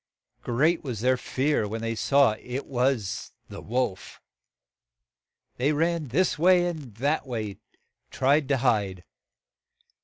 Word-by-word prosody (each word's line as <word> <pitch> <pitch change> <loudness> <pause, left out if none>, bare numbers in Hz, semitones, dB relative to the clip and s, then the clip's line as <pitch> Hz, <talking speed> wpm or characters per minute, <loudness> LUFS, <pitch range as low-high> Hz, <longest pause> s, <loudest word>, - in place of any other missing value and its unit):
Great 155 +8 +1
was 120 -7 -4
their 130 +1 +3
fear 130 -1 0
when 110 +2 -4
they 115 0 -2
saw 140 +2 +3
it 125 +3 -5
was 125 -5 -1 0.2
the - - -8
wolf. 120 -5 -3 1.4
They 140 +5 +1
ran 165 0 0
this 160 +6 +1
way 180 +1 +5
and 150 -11 -5
that 140 +5 -1
way 110 -5 -3
to - - -25 0.5
try 140 +3 +3
to 140 -2 0
hide. 105 -8 0
130 Hz, 130 wpm, -26 LUFS, 115-150 Hz, 1.4 s, way